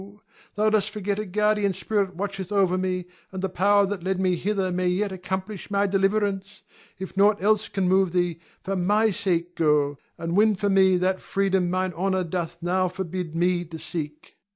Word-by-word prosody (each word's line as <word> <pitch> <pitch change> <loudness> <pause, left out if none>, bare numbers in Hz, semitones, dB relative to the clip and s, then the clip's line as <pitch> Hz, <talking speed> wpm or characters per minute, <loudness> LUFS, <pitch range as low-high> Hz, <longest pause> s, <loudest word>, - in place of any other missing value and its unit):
Thou 215 +1 +2
dost 215 -1 +2
forget 205 -1 -3
a 215 - -4
guardian 210 +1 +1
spirit 200 -3 -1
watcheth 195 0 -4
over 195 -3 +3
me, 185 -1 -1 0.3
and 190 0 -6
the 190 - 0
power 200 +2 +3
that 195 -1 -4
led 190 +1 -1
me 185 -1 +2
hither 190 0 -1
may 180 0 0
yet 195 +3 0
accomplish 190 +2 -5
my 200 0 +2
deliverance. 195 0 0 0.3
If 190 0 -7
nought 205 +1 +4
else 210 +2 +2
can 195 -2 -1
move 190 -1 +3
thee, 175 -2 0 0.2
for 195 - -2
my 210 +4 +2
sake 175 -2 -1
go, 150 -3 +2 0.2
and 165 +1 -3
win 215 +1 +4
for 200 +2 -1
me 190 -1 +5
that 185 +1 0
freedom 190 -2 0
mine 185 0 -1
honor 190 +1 0
doth 170 -1 -4
now 185 +1 +1
forbid 180 -2 -5
me 175 +1 +1
to 165 0 -8
seek. 150 -2 -7
190 Hz, 185 wpm, -25 LUFS, 180-200 Hz, 0.3 s, me